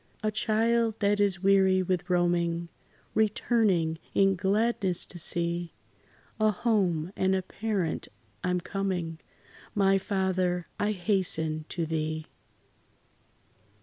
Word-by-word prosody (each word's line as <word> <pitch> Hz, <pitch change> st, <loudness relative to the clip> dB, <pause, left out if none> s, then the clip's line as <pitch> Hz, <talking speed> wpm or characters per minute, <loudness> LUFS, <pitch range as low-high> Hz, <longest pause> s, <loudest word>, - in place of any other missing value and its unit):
A 215 Hz, -, +1 dB
child 225 Hz, +1 st, +1 dB
that 205 Hz, 0 st, +2 dB
is 195 Hz, -3 st, +1 dB
weary 190 Hz, -1 st, +4 dB
with 185 Hz, -1 st, -2 dB
roaming, 170 Hz, -1 st, +1 dB, 0.4 s
Returning 210 Hz, -6 st, +2 dB, 0.2 s
in 195 Hz, 0 st, +4 dB
gladness 195 Hz, -1 st, +1 dB
to 175 Hz, -, -8 dB
see 170 Hz, +1 st, -1 dB, 0.6 s
A 215 Hz, 0 st, +4 dB
home 190 Hz, -6 st, 0 dB
and 190 Hz, 0 st, +2 dB
a 190 Hz, -, -1 dB
parent, 195 Hz, -5 st, -2 dB, 0.4 s
I 180 Hz, -, 0 dB
'm 180 Hz, 0 st, 0 dB
coming 180 Hz, -4 st, -3 dB, 0.6 s
My 195 Hz, -1 st, +4 dB
Father, 185 Hz, -2 st, 0 dB
I 210 Hz, +1 st, +1 dB
hasten 175 Hz, -5 st, 0 dB
to 170 Hz, -2 st, -2 dB
thee! 155 Hz, 0 st, -2 dB
185 Hz, 115 wpm, -28 LUFS, 170-205 Hz, 0.6 s, weary